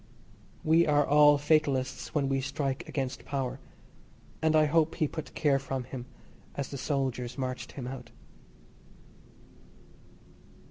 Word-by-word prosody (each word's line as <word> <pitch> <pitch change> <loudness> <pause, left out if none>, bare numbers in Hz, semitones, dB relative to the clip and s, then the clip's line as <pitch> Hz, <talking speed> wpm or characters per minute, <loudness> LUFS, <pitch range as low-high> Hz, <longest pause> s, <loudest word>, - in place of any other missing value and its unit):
We 165 +2 +4
are 145 -1 +4
all 145 0 +6
fatalists 145 -3 +1
when 140 -2 +2
we 135 0 0
strike 135 0 -3
against 135 -2 -3
power, 135 -3 -3 0.8
and 160 0 +3
I 155 0 +6
hope 160 +1 +2
he 155 -3 +1
put 155 +2 -7
care 140 -3 +3
from 135 -1 -3
him 125 0 -8 0.5
as 140 -2 -3
the 140 - -5
soldiers 130 -3 -2
marched 130 -1 -4
him 130 - -6
out. 125 -2 -7
140 Hz, 130 wpm, -29 LUFS, 130-150 Hz, 0.8 s, all